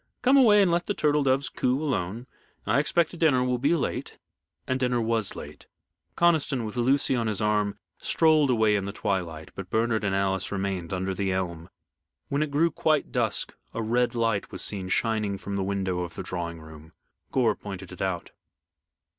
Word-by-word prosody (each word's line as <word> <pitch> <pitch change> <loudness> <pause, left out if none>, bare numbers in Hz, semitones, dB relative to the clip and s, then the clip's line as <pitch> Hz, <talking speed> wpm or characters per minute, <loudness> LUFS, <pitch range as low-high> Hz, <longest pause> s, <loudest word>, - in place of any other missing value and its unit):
"Come 260 +2 +5
away 215 -7 +7
and 180 - +2
let 170 +1 0
the 205 - -1
turtle 150 0 +2
doves 135 0 +2
coo 130 +2 0
alone. 120 - -2 0.4
I - - +3
expect 170 +3 +1
dinner 145 -6 +4
will 125 -1 0
be 145 +7 +3
late." 160 - -3 0.5
And 130 0 -1
dinner 125 -1 +1
was 115 -3 0
late. - - -10 0.5
Conniston, 155 -8 +2
with 110 - -6
Lucy 130 +2 +2
on 115 -2 0
his 105 -2 -1
arm, 105 -1 +1 0.2
strolled 155 -3 +3
away 110 -4 +3
in 100 -1 -1
the 100 - -5
twilight, 85 -7 -3
but 95 -2 -8
Bernard 110 +1 +1
and 100 -1 0
Alice 95 -1 0
remained 95 -4 -3
under 95 +1 -1
the 95 0 -1
elm. 85 -3 -3 0.6
When 140 +1 0
it 155 - 0
grew 160 +4 +2
quite 155 -1 +1
dusk 115 -4 -1 0.2
a 115 - -2
red 120 +2 +1
light 115 -3 0
was - - -2
seen 95 -3 -2
shining 105 -2 0
from 100 +1 -5
the 100 - -1
window 95 -2 -1
of 85 -1 -5
the - - -5
drawing 85 -2 -4
room. 80 0 -13 0.4
Gore 125 -4 +3
pointed 95 -2 -8
it 90 - -9
out. 95 -3 -2
110 Hz, 190 wpm, -26 LUFS, 95-135 Hz, 0.6 s, away